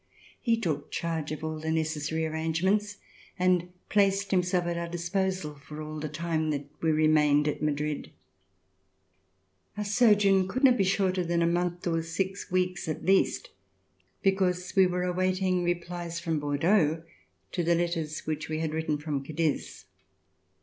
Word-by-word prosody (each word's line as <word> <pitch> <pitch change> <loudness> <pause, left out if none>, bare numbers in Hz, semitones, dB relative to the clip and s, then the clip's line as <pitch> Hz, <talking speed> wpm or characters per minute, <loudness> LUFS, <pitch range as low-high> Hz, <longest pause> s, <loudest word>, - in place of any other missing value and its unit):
He 230 -2 +2
took 155 -9 -2
charge 160 -3 -3
of 155 0 -5
all 155 0 -3
the 160 +1 -4
necessary 160 0 -1
arrangements 175 +7 0 0.4
and 180 -1 +2 0.2
placed 200 -1 +2
himself 180 -1 +2
at 175 0 -1
our 170 0 -3
disposal 175 -1 -2
for 145 +1 -11
all 155 0 -6
the 155 0 -4
time 160 0 -1
that 145 -1 -2 0.2
we 165 - +2
re 155 0 +3
mained 150 -1 +4
at 150 - -2
Madrid. 150 0 -1 1.7
Our 210 - -2
sojourn 205 -3 +4
could 255 +8 -3
not 255 -2 +7
be 200 - +2
shorter 190 -1 +1
than 170 0 +1
a - - +3
month 175 +1 0
or 165 -2 +1
six 190 +4 -3
weeks 180 -1 0
at 155 - -4
least, 195 +2 +2 0.7
because 185 -2 +1
we 190 -1 +6
were 180 0 -1
awaiting 185 0 +1
replies 175 -1 -3
from 165 -3 -1
Bordeaux 160 +2 +2 0.5
to 175 - -1
the 170 +1 +3
letters 165 -3 -2
which 155 0 -3
we 155 - -1
had 160 -1 -2
written 160 -1 -1
from 145 -2 -3
Cadiz. 155 0 -2
170 Hz, 155 wpm, -28 LUFS, 155-185 Hz, 1.7 s, not